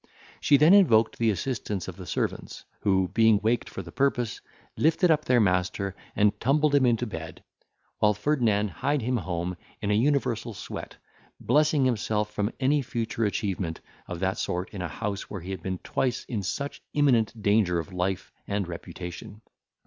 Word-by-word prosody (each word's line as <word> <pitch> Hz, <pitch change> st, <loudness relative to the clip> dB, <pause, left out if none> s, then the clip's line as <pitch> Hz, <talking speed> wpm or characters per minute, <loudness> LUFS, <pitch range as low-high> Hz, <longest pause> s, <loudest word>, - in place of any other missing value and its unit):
She 145 Hz, -, +5 dB
then 155 Hz, +6 st, +6 dB
invoked 115 Hz, -, +5 dB
the 115 Hz, -1 st, +3 dB
assistance 105 Hz, -2 st, -2 dB
of -, -, -6 dB
the -, -, -10 dB
servants, -, -, -3 dB, 0.2 s
who, 95 Hz, -2 st, +2 dB
being 110 Hz, -2 st, +4 dB
waked 115 Hz, +2 st, +1 dB
for 95 Hz, -, -6 dB
the 85 Hz, -, -11 dB
purpose, 125 Hz, -3 st, 0 dB, 0.3 s
lifted 165 Hz, +3 st, +3 dB
up 155 Hz, -1 st, +2 dB
their 125 Hz, -1 st, +4 dB
master, 95 Hz, 0 st, +1 dB, 0.2 s
and 105 Hz, 0 st, +2 dB
tumbled 145 Hz, +3 st, +2 dB
him 140 Hz, -3 st, +5 dB
into 120 Hz, 0 st, +2 dB
bed, 80 Hz, -7 st, -7 dB, 0.6 s
while 105 Hz, -1 st, +4 dB
Ferdinand 105 Hz, -4 st, +1 dB
hied 140 Hz, +4 st, -1 dB
him 125 Hz, +2 st, +1 dB
home 90 Hz, -2 st, -3 dB, 0.2 s
in 105 Hz, -1 st, -1 dB
an 105 Hz, +2 st, +3 dB
universal 120 Hz, -5 st, 0 dB
sweat, -, -, -7 dB, 0.4 s
blessing 150 Hz, -2 st, +3 dB
himself 105 Hz, -3 st, 0 dB
from 105 Hz, +2 st, -1 dB
any 140 Hz, +2 st, +3 dB
future 115 Hz, -2 st, -2 dB
achievement 95 Hz, -5 st, -2 dB, 0.3 s
of 90 Hz, -1 st, -5 dB
that 95 Hz, 0 st, 0 dB
sort 90 Hz, +1 st, -2 dB
in 100 Hz, -, -5 dB
a 90 Hz, -, -2 dB
house 100 Hz, +4 st, -4 dB
where 100 Hz, -, -6 dB
he 90 Hz, +3 st, -6 dB
had 95 Hz, -3 st, -5 dB
been 95 Hz, +1 st, -3 dB
twice 125 Hz, +6 st, -2 dB
in 110 Hz, -5 st, -3 dB
such 100 Hz, +10 st, -4 dB
imminent 120 Hz, -6 st, +3 dB
danger 100 Hz, -4 st, +2 dB
of 85 Hz, +3 st, -5 dB
life 90 Hz, +1 st, -2 dB, 0.2 s
and 100 Hz, -2 st, -1 dB
reputation. 90 Hz, +4 st, -8 dB
105 Hz, 170 wpm, -27 LUFS, 95-130 Hz, 0.6 s, then